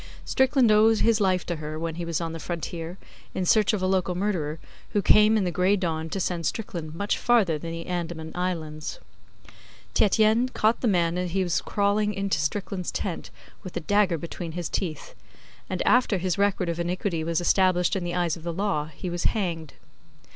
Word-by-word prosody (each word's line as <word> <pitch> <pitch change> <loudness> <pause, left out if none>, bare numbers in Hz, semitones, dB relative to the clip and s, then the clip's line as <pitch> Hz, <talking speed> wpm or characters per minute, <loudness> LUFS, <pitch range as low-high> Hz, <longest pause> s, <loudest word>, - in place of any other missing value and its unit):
Strickland 265 -3 +3
owed 215 +1 +5
his 225 -1 +3
life 185 -2 +2
to 175 - -3
her, 155 0 -5
when 165 0 -3
he 170 +1 -5
was 165 -2 -1
on 165 -1 -3
the 165 - -6
Frontier, 170 +1 -5 0.4
in 185 - -1
search 215 +3 +4
of 205 -4 -2
a - - +2
local 185 -1 +1
murderer, 175 -6 -1 0.4
who 205 - +2
came 215 +3 +6
in 210 - +1
the 180 - 0
gray 180 +4 +3
dawn 165 -4 -2
to 195 - -3
send 170 -3 -1
Strickland 170 -8 -5
much 200 +4 -1
farther 205 -11 +3
than 165 +2 -6
the 165 0 -6
Andaman 170 -2 -4
Islands. 165 - -3 1.0
Tietjens 220 +4 +3
caught 220 +2 +2
the 245 - +1
man 175 -3 +2
as 180 0 -2
he 190 0 +2
was 175 -2 0
crawling 210 +1 +1
into 195 -4 0
Strickland's 180 +4 -2
tent 180 -4 -4 0.3
with 185 -3 -7
a - - +1
dagger 195 0 +2
between 170 +1 -6
his 175 -1 -4
teeth; 160 -6 -4 0.6
and 185 - -1
after 245 -5 +4
his 180 -1 -1
record 200 -2 +1
of 170 0 -2
iniquity 175 -1 -1
was 165 +1 0
established 180 0 +3
in 190 - -2
the 175 0 -3
eyes 175 -3 +1
of 170 - -11
the 170 +1 -3
law 180 -4 -1
he 160 +4 -8
was 175 0 -3
hanged. 170 -8 -1
180 Hz, 195 wpm, -26 LUFS, 165-205 Hz, 1.0 s, came